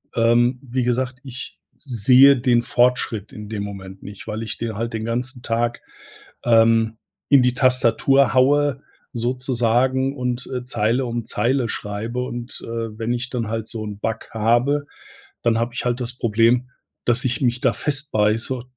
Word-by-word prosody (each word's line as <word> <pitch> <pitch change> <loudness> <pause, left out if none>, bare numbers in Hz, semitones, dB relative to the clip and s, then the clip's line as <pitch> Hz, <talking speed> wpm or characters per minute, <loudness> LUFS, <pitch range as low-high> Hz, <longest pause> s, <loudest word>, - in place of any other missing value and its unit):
ähm, 120 +2 +3
wie 130 0 -2
gesagt, 125 +1 -1
ich 130 -1 -7 0.2
sehe 130 +2 +5
den 120 -1 +2
Fortschritt 120 -4 0
in 105 -1 -8
dem 105 -2 -4
Moment 95 -1 -8
nicht, 100 0 -10
weil 110 +1 -4
ich 110 - -3
de 115 -1 -3
halt 115 +2 -4
den 110 0 -3
ganzen 125 +2 -3
Tag, 120 +1 -1 0.6
ähm, 115 -1 +4 0.3
in 140 -3 +6
die 125 0 +2
Tastatur 130 +1 +3
haue 140 +1 +3 0.3
sozusagen 125 +2 0
und, 125 0 -2
äh, 125 -1 -3
Zeile 125 +2 0
um 120 -1 -3
Zeile 120 +4 0
schreibe 115 +5 -4
und, 120 0 -5
äh, - - -10 0.3
wenn 115 +1 -2
ich 125 +1 -2
dann 120 -4 -2
halt 110 0 -4
so 110 -2 -4
'n 105 -1 -7
Bug 110 +1 -4
habe, 120 +6 +1 0.6
dann 115 -1 +2
habe 115 +1 -1
ich - - -4
halt 120 +1 0
das 120 0 -3
Problem, 115 +3 +2 0.4
dass 120 +1 +2
ich 120 0 -1
mich 120 -1 +1
da 125 - +3
festbeiße 120 -3 0
120 Hz, 165 wpm, -21 LUFS, 115-130 Hz, 0.6 s, in